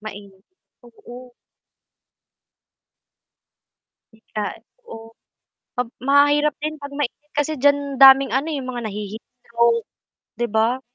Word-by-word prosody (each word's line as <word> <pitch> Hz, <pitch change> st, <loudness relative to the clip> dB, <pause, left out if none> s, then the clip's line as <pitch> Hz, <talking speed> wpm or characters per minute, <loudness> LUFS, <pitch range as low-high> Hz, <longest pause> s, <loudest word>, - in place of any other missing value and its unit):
Mainit, 200 Hz, -2 st, -11 dB, 0.4 s
oo. 245 Hz, +1 st, -14 dB, 2.8 s
Bigla 220 Hz, -1 st, -6 dB, 0.3 s
oh. 225 Hz, 0 st, -11 dB, 0.6 s
Pab 245 Hz, -2 st, -3 dB, 0.2 s
mahirap 290 Hz, +2 st, +4 dB
din 310 Hz, +1 st, -4 dB
pag 285 Hz, -1 st, -9 dB
mainit 295 Hz, +1 st, -5 dB
kasi 295 Hz, +1 st, -1 dB
diyan 285 Hz, 0 st, +1 dB
daming 270 Hz, 0 st, +8 dB
ano 265 Hz, +4 st, 0 dB
eh, -, -, -2 dB
yung 255 Hz, -, -7 dB
mga 240 Hz, -2 st, -5 dB
nahi-heatstroke 230 Hz, +3 st, -2 dB, 0.5 s
'di 240 Hz, -, -2 dB
ba? 225 Hz, +4 st, +1 dB
250 Hz, 105 wpm, -21 LUFS, 225-285 Hz, 2.8 s, daming